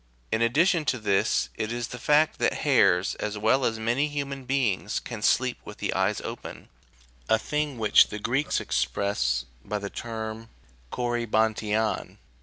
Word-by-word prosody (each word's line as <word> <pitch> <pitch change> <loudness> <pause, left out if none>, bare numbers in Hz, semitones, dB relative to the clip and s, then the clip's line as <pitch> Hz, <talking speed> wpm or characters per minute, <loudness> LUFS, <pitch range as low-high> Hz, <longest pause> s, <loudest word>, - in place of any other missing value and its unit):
In 110 - +1
addition 155 +8 +3
to 130 - +1
this, 100 -4 +1
it 110 +1 -2
is 120 0 -3
the 125 - -7
fact 150 +5 +3
that - - 0
hares, 90 +2 +4
as 105 0 -3
well 110 +6 +2
as 115 -2 0
many 120 +6 +1
human 140 -2 -4
beings, 120 -7 0
can 115 -4 -7
sleep 125 +3 +2
with 105 - -10
the - - -2
eyes 95 +2 +1
open, - - -8 0.6
a 110 - +5
thing 150 +3 -2
which 110 -2 +5
the 105 - -6
Greeks 130 +7 0
express 65 -1 0 0.2
by 105 - -3
the 100 -1 -6
term 110 -1 -6 0.4
7t,opvJ3avriav. 110 -2 0
110 Hz, 155 wpm, -26 LUFS, 105-130 Hz, 0.6 s, a